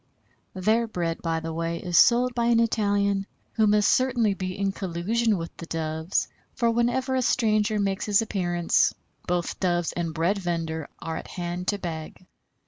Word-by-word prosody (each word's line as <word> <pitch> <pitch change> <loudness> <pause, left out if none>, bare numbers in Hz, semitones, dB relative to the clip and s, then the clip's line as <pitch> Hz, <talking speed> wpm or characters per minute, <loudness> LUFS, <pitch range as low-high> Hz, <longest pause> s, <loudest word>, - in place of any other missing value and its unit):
Their 220 +5 +2
bread, 170 -5 -3
by 165 -1 -1
the 165 0 -4
way, 165 +1 -2
is 175 0 -4
sold 245 +4 +5
by 235 -1 0
an 235 -1 +4
Italian, 200 -3 +1 0.3
who 220 -2 +3
must 210 0 +4
certainly 245 -5 +2
be 185 -1 -4
in 200 0 0
collusion 200 +4 0
with 165 -1 -6
the 170 - -8
Doves, 160 +1 -1 0.3
for 235 -2 +2
whenever 245 +3 +1
a 260 - +2
stranger 215 -3 +2
makes 195 0 -1
his 205 -1 +4
appearance, 175 -6 +1 0.3
both 175 -1 -1
Doves 175 -2 +1
and 170 -2 -3
bread 170 +5 0
vender 165 -4 -3
are 165 0 -5
at - - -7
hand 175 0 -5
to 205 - +1
beg. 170 -1 -7
195 Hz, 170 wpm, -26 LUFS, 170-220 Hz, 0.3 s, sold